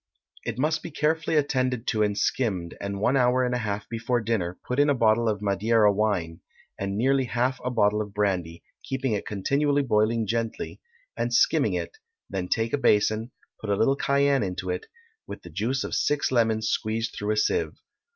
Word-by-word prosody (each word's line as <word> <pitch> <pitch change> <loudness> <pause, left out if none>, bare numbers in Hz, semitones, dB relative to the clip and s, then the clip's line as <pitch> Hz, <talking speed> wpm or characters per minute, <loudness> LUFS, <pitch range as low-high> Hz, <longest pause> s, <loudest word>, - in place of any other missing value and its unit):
It 115 - -4
must 155 +4 0
be - - -7
carefully 160 +1 0
attended 130 -5 +1
to 110 - 0
and 105 -1 +1
skimmed, 95 -11 -1
and 100 0 -4
one 125 +6 +2
hour 125 0 +3
and 125 0 0
a 125 - 0
half 105 -2 -3
before 120 +1 -1
dinner 105 -6 -2
put 125 +2 -2
in 145 +1 +4
a 140 - +3
bottle 115 -1 +3
of 105 -1 -2
Madeira 105 +1 +3
wine, 95 -6 -1 0.4
and 100 0 -2
nearly 135 +3 +2
half 125 +2 -1
a 125 - -1
bottle 105 -3 +2
of 105 -1 -6
brandy, 95 -5 -1 0.2
keeping 135 -1 -2
it 105 - -3
continually 140 +8 +1
boiling 110 -1 +1
gently, 115 +1 -3 0.3
and - - -2
skimming - - +3
it, 440 - -5 0.3
then 95 -2 -2
take 115 +4 0
a 145 - +1
basin, 110 -1 +2 0.3
put 110 - -6
a 100 - +3
little 135 +7 +3
cayenne 140 -1 +2
into 90 -2 -3
it, 90 - -4 0.4
with - - -8
the 85 - -11
juice 115 - -1
of - - -5
six 145 -2 +1
lemons 110 -3 +2
squeezed 110 +2 -1
through 105 - -4
a - - -3
sieve. 110 - +1
115 Hz, 190 wpm, -26 LUFS, 105-130 Hz, 0.4 s, in